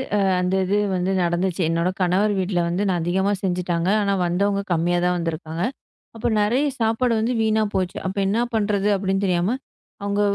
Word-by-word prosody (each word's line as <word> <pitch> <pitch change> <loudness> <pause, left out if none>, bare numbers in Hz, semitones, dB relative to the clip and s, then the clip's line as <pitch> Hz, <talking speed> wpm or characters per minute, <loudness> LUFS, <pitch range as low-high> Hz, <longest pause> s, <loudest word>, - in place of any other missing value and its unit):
அ - - +3 0.2
அந்த 180 +1 0
இது 200 +3 +1 0.2
வந்து 185 +1 0
நடந்துச்சு. 175 +2 0
என்னோட 170 +2 +1
கணவர் 190 +4 +2
வீட்ல 185 -1 0
வந்து 180 +4 -1
நான் 180 -2 0
அதிகமா 190 +4 +1
செஞ்சுட்டாங்க. 175 -1 0
ஆனா 200 -1 +1
வந்தவுங்க 200 +3 +1
கம்மியா 175 +2 +1
தான் 180 - +2
வந்துருக்காங்க. 165 0 -3 0.5
அப்போ 225 - -2
நறைய 245 +8 +2
சாப்பாடு 225 +2 +1
வந்து 230 +3 0
வீணா 220 0 +2
போச்சு. 185 -1 -1
அப்ப 190 +2 -4
என்ன 210 +4 +1
பண்றது 205 -2 +1
அப்பிடின்னு 195 0 -1
தெரியாம, 180 +5 +1 0.5
அவுங்க, 200 0 0
190 Hz, 170 wpm, -22 LUFS, 175-205 Hz, 0.5 s, அ